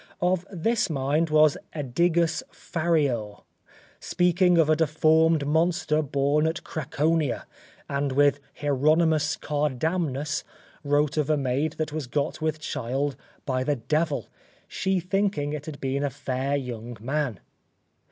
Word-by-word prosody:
Of 180 +1 0
this 205 +4 0
mind 150 +3 0
was 155 -1 +5 0.2
Adigus 165 +4 +1
Fariur, 145 - -1 0.6
speaking 180 0 +2
of 165 -3 +5
a 155 - +4
deformed 160 0 +3
monster 160 +1 +1
born 145 +1 +1
at 165 +2 -3
Craconia; 155 -2 -1 0.4
and 140 0 -1
Hieronimus 145 +2 +2
Cardamnus 150 +1 -1 0.4
wrote 145 +1 +1
of 150 -1 +1
a 155 - +3
maid 140 +3 0
that 155 -2 -3
was 155 -4 -3
got 145 +5 -2
with 155 -1 -1
child 135 0 -2 0.3
by 130 -2 0
the 145 +2 +1
devil, 150 +5 -1 0.4
she 190 -1 0
thinking 185 -5 -1
it 150 0 -6
had 150 -2 -7
been 135 +1 -1
a 145 - +1
fair 135 0 -2
young 120 -3 -5
man. 130 -3 -2
150 Hz, 125 wpm, -26 LUFS, 140-160 Hz, 0.6 s, was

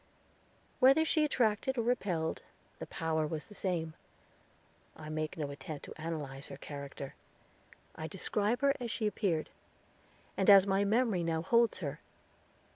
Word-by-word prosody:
Whether 275 +5 +6
she 315 -1 +2
attracted 255 -2 +1
or 235 - +1
repelled, 185 -9 0 0.4
the - - -6
power 160 -1 -1
was 155 0 -4
the 210 - -14
same. 170 -5 -2 1.0
I 155 -1 -9
make 155 +2 -3
no 145 -3 -3
attempt 150 +1 -7
to - - -9
analyze 145 -4 -4
her 140 - -8
character. 140 -1 -7 0.8
I 160 - -5
describe 210 - -1
her 280 0 +4
as 240 -2 -4
she 220 - -2
appeared, 190 -7 0 0.8
and 190 - +2
as 195 -1 +9
my 195 0 +2
memory 215 -2 +2
now 165 -1 -1
holds 235 +4 +3
her. - - -4
185 Hz, 145 wpm, -33 LUFS, 155-225 Hz, 1.0 s, as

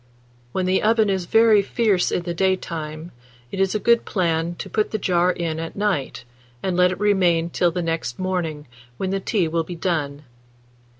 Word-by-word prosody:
When 185 +5 -1
the 185 +1 +2
oven 220 -1 +3
is 190 -2 -1
very 225 -1 +5
fierce 200 -2 +1
in 175 - -1
the 175 0 -3
daytime, 165 -3 -2 0.4
it 195 - -5
is 195 +1 +1
a - - +1
good 235 +2 +3
plan 170 -2 -1
to - - -7
put 215 -1 0
the 215 - -2
jar 180 -2 +2
in 165 -3 -3
at 165 0 -6
night, 190 -11 -1 0.4
and 185 -2 -1
let 180 0 +4
it 185 - -5
remain 180 -5 +2
till 175 - +2
the 175 +1 -3
next 165 -7 -3
morning, 170 -6 -3 0.3
when 190 -1 -2
the 195 - 0
tea 195 -3 0
will 165 +1 0
be 175 +2 -7
done. 150 -5 -2
180 Hz, 190 wpm, -22 LUFS, 165-195 Hz, 0.4 s, very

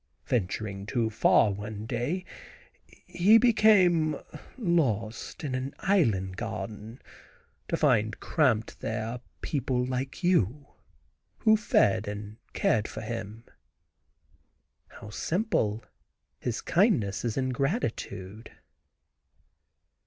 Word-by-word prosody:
Venturing 100 -2 -2
too 115 -1 0
far 110 -1 +4
one 105 +1 -6
day, 130 +11 -2 0.8
he 200 +6 +5
became 195 -9 +4 0.4
lost 130 - -1
in 140 -4 -3
an 130 +2 -3
island 105 - +1
garden, 105 +4 -6 0.7
to - - -1
find 110 0 +2
camped 125 -9 +1
there 110 0 -3
a 120 +1 -5 0.2
people 125 -3 -1
like 130 +6 -4
you, 145 - +2 0.7
who 220 -2 +4
fed 110 - +2
and 105 +1 -6 0.2
cared 110 -1 +1
for - - -7
him." 115 -1 -6 1.4
How 105 -1 -12
simple; 115 - -1 0.5
his 120 -3 -3
kindness 165 - +2
is 115 -3 -2
in 130 -1 0
gratitude. 115 - -3
120 Hz, 100 wpm, -28 LUFS, 105-160 Hz, 1.4 s, he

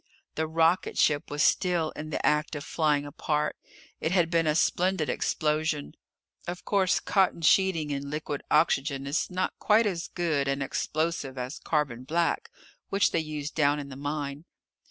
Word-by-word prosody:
The 160 0 -1
rocketship 160 -2 +2
was 145 0 0
still 175 -4 +2
in 155 0 -7
the - - -2
act 150 +1 +1
of 145 - -5
flying 150 -3 +1
apart. 150 +1 -1 0.4
It 160 - -1
had 175 -3 +2
been 165 -2 +2
a 150 - +2
splendid 180 -1 +1
explosion. 155 -1 -1 0.5
Of 175 +1 -5
course 190 -3 +2
cotton 190 -4 +1
sheeting 165 -3 +3
in 140 0 -3
liquid 150 -1 -4
oxygen 140 -3 +2
is 140 +5 -1
not 185 0 -1
quite 220 +2 +4
as 175 -5 -2
good 155 -5 -1
an 135 0 0
explosive 155 -1 -2
as 125 +3 -5
carbon 140 -6 -1
black, 165 +5 0 0.4
which 195 0 +2
they - - +1
used 155 -2 -5
down 145 -1 +2
in 140 -1 -6
the 130 - -8
mine. 145 +1 -4
155 Hz, 160 wpm, -28 LUFS, 145-170 Hz, 0.5 s, quite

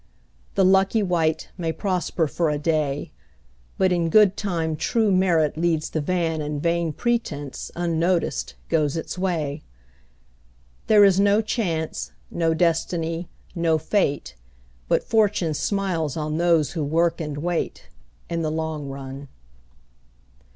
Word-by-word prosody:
The 195 - +4
lucky 195 +3 +4
wight 165 -4 0
may 165 -2 -1
prosper 180 -1 -1
for 160 +2 0
a 150 - 0
day, 150 -2 -1 0.7
But 185 -1 +3
in 170 -2 +1
good 205 +1 +5
time 165 -6 -2
true 220 +6 +1
merit 170 -5 +2
leads 160 -2 0
the 155 - -1
van 165 -1 0
And 150 0 -3
vain 170 +1 0
pretence, 150 - -2
unnoticed, 170 +1 0
goes 155 -2 +1
its 160 - -4
way. 160 -6 -2 1.3
There 210 -1 +7
is 195 -1 +4
no 200 +1 +4
Chance, 160 - -2 0.2
no 165 -1 +1
Destiny, 165 0 0 0.2
no 165 -3 +2
Fate, 155 -2 -1 0.5
But - - +2
Fortune 205 -7 +2
smiles 170 -5 -1
on 155 0 -2
those 170 -4 +3
who 160 -4 -2
work 165 +3 +1
and 150 -2 -4
wait, 170 +3 -3 0.4
In 170 -1 -2
the 155 - 0
long 155 -2 -3
run. 135 +1 -7
165 Hz, 130 wpm, -23 LUFS, 155-185 Hz, 1.3 s, There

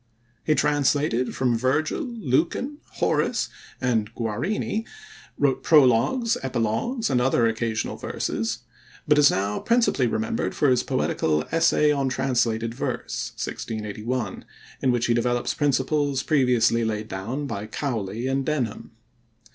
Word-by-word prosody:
He 155 - +2
translated 145 -4 +1
from 125 -3 +1
Virgil, 130 +6 0
Lucan, 235 - -1
Horace, - - 0 0.3
and 115 -5 0
Guarini; 130 - -2 0.5
wrote 135 -2 +1
prologues, 150 - +4
epilogues, 135 - -1
and 125 -2 +2
other 125 -2 +3
occasional 115 -1 -1
verses; 115 +1 -3 0.4
but 150 0 +5
is 145 -1 +7
now 100 +2 -1
principally 235 - +2
remembered 110 0 -2
for 145 -3 +3
his 125 - +3
poetical 75 -1 0
Essay 165 -2 +3
on 140 -2 +1
Translated 120 -3 0
Verse - - -4
(1681), 110 0 -4 0.4
in 130 - +3
which 120 -1 +1
he 120 - +2
develops 120 +1 0
principles 145 0 +1
previously 125 -5 +3
laid 110 -1 -2
down 115 +10 -4
by 105 -6 -5
Cowley 115 -3 -3
and 135 +1 0
Denham. 125 -7 -3
125 Hz, 125 wpm, -24 LUFS, 115-145 Hz, 0.5 s, is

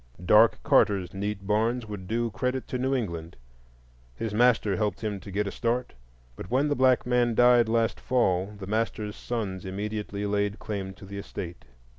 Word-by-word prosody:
Dark 105 +4 +6
Carter's 100 -4 +3
neat 100 0 -4
barns 110 +4 +1
would 100 -4 -7
do 115 +2 -1
credit 125 +3 -2
to 125 - -2
New 130 +2 +1
England. 85 -9 -4 0.8
His 110 - -4
master 110 -3 +3
helped 105 0 -1
him 105 -2 -2
to 95 - -11
get 100 +2 -1
a 100 - -3
start, 120 +3 -1 0.4
but 90 - -9
when 135 +5 +2
the 145 - +1
black 130 -1 +3
man 120 -1 +2
died 120 -1 +5
last 115 0 +1
fall 95 -7 +1
the 100 - -7
master's 105 0 -2
sons 100 -6 -4
immediately 105 +1 -4
laid 100 0 0
claim 95 -2 -5
to 100 - -12
the 100 +1 -7
estate. 85 -8 -7
105 Hz, 175 wpm, -27 LUFS, 100-120 Hz, 0.8 s, Dark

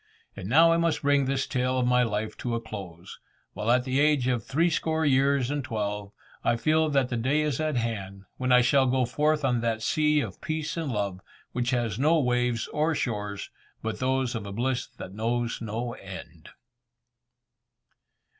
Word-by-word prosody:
And 95 - -6
now 165 +6 +6
I 165 - +3
must 170 -2 0
bring 140 -1 +3
this 135 0 0
tale 130 -1 0
of 125 - +1
my 125 0 +4
life 110 -2 -1
to 120 -1 -2
a - - -1
close, 95 -7 -9 0.3
while 105 +2 -3
at 125 +1 +4
the 130 +1 0
age 145 -4 +3
of 120 -4 0
three 165 +8 +1
score 160 0 0
years 135 -1 +3
and 145 -1 -2
twelve, 105 -4 -3 0.3
I 115 - +2
feel 155 +5 +2
that 135 -3 +2
the 120 - -2
day 135 +6 +1
is 150 -4 -1
at 155 -2 0
hand, 100 -5 -3
when 130 0 -1
I 125 0 +7
shall 130 +2 +3
go 130 0 +2
forth 150 +4 +1
on 125 -3 +1
that 115 -1 -1
sea 150 +4 +2
of - - -5
peace 155 -1 -3
and 160 -5 -2
love, 100 -4 -2 0.3
which 120 -1 -1
has 120 -4 -1
no 155 +4 +4
waves 125 -3 +1
or 155 +2 0
shores 105 -5 -3 0.3
but 110 -1 -3
those 130 -1 0
of 115 - -3
bliss 125 +2 -1
that 95 - -8
knows 115 +3 -1
no 115 +2 -3
end. - - -10
125 Hz, 185 wpm, -27 LUFS, 115-145 Hz, 0.3 s, I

